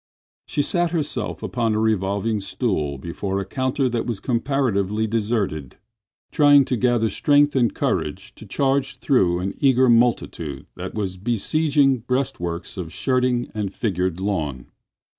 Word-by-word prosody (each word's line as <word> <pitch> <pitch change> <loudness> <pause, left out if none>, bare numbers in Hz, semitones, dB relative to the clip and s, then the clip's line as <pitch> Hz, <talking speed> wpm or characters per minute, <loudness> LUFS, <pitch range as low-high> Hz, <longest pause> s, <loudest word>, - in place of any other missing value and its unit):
She 145 - 0
sat 175 +1 +1
herself 150 -9 -2
upon 115 -3 0
a - - +1
revolving 105 0 0
stool 95 - -2
before 95 +6 -3
a 100 - -3
counter 130 +5 -1
that 120 -1 -2
was 115 -5 -2
comparatively 115 -5 0
deserted, 105 - -2 0.5
trying 145 -3 +6
to 125 - -1
gather 120 -2 +2
strength 145 +7 +3
and 120 -5 +3
courage - - -2
to - - -13
charge 135 0 0
through 90 -10 +2
an 95 +2 -3
eager 130 -2 +4
multitude 115 - +1
that - - -7
was 95 -3 -3
besieging 135 - +1
breastworks 105 -9 -3
of 85 -3 -5
shirting 125 +2 0
and 105 -3 -4
figured 95 -5 -1
lawn. 80 -10 -3
115 Hz, 140 wpm, -22 LUFS, 95-130 Hz, 0.5 s, trying